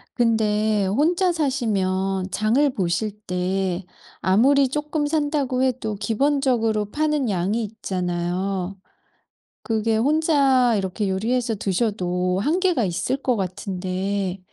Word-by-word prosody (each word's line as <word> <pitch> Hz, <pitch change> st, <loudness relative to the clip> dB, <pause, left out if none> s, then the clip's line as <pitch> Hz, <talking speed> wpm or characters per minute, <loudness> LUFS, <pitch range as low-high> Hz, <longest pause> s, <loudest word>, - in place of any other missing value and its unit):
근데 215 Hz, -3 st, +2 dB
혼자 340 Hz, -, +2 dB
사시면 195 Hz, -, -1 dB
장을 225 Hz, +9 st, +2 dB
보실 185 Hz, +2 st, -1 dB, 0.2 s
때 180 Hz, 0 st, -1 dB, 0.4 s
아무리 265 Hz, +9 st, +4 dB
쪼끔 295 Hz, +2 st, -2 dB
산다고 290 Hz, -4 st, 0 dB
해도 245 Hz, -5 st, -1 dB
기본적으로 225 Hz, 0 st, +1 dB
파는 300 Hz, +2 st, 0 dB
양이 200 Hz, +4 st, 0 dB
있잖아요. 185 Hz, -2 st, -3 dB, 0.9 s
그게 225 Hz, -1 st, 0 dB
혼자 275 Hz, -3 st, +3 dB
이렇게 195 Hz, +1 st, -2 dB
요리해서 230 Hz, +4 st, 0 dB
드셔도 185 Hz, -3 st, -1 dB
한계가 335 Hz, -, +1 dB
있을 200 Hz, +8 st, -1 dB
것 260 Hz, -3 st, 0 dB
같은데 190 Hz, 0 st, -3 dB
215 Hz, 240 characters per minute, -23 LUFS, 190-265 Hz, 0.9 s, 아무리